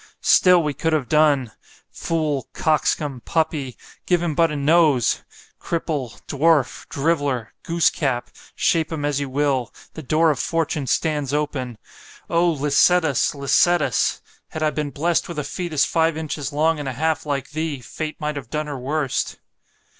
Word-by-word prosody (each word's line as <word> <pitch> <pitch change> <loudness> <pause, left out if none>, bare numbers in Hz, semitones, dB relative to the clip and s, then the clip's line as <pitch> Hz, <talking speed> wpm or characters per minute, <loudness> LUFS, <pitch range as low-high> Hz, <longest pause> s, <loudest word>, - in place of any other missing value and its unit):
——Still 180 -2 +5
we 150 -1 -1
could 160 +4 -1
have 145 -5 0
done.——Fool, 150 +2 -1
coxcomb, 150 -4 0
puppy——give 160 +2 -2
him 165 -3 -1
but 165 +2 +3
a 150 - -4
NOSE——Cripple, 145 -1 0
Dwarf, 150 -2 +1
Driveller, 140 -6 -1
Goosecap——shape 155 0 0
him 150 -3 -3
as 145 -1 0
you 140 -1 -3
will) 135 -3 0 0.2
the 160 - -7
door 155 +3 +3
of 145 - -3
fortune 160 -4 -1
stands 145 -2 0
open—O 150 +4 -3
Licetus! 150 +1 +2
Licetus! 150 +4 +2 0.3
had 155 - -5
I 155 - +2
been 150 -1 -3
blest 165 +4 0
with 170 - -7
a 150 - -1
fœtus 155 0 -1
five 165 -1 +1
inches 155 -2 -4
long 155 +2 +1
and 145 -2 -3
a - - -4
half, 160 +3 -1
like 140 -1 -2
thee—Fate 155 0 -4
might 150 -2 -3
have 125 -5 -7
done 150 0 -2
her 145 -3 -5
worst. 140 +1 -2
150 Hz, 140 wpm, -22 LUFS, 140-160 Hz, 0.3 s, Still